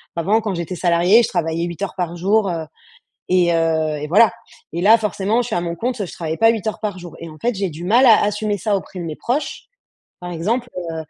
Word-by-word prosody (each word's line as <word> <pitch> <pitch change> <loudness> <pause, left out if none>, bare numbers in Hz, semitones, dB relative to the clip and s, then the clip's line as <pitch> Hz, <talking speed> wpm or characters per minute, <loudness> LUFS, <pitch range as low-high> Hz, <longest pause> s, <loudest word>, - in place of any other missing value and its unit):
Avant, 195 +7 +2
quand 205 -4 -3
j'étais 170 +1 -4
salariée, 180 +6 +4
je - - 0
travaillais 165 +1 -1
8 170 +1 -7
heures 200 - -3
par 175 -1 -2
jour, 200 +2 +2
heu 165 -2 -3 0.7
et 180 -2 +3
heu 160 -2 +1
et 150 - -4
voilà 205 +4 +5 0.4
et 170 - -2
là, 215 +4 +7
forcément, 210 +2 0
je 240 - -5
suis 220 - -2
à 175 - 0
mon 170 -1 -3
compte, 235 0 -2
je - - -10
travaille 160 -1 -4
pas 225 0 +5
8 220 -2 -4
heures 215 - -3
par 205 -4 -3
jour 175 -2 -10
et 165 - -8
en 155 - -12
fait, 240 -1 -1
j'ai 195 -2 -1
du 160 +3 -8
mal 240 +7 +5
à 225 -3 +6
assumer 210 0 -1
ça 205 +1 0
auprès 185 -1 -8
de 170 - -5
mes 155 -2 -5
proches. 265 +6 -3 0.6
Par 175 0 -6
exemple, 230 +9 -1
heu, 165 -2 -4
185 Hz, 250 wpm, -20 LUFS, 170-215 Hz, 0.7 s, là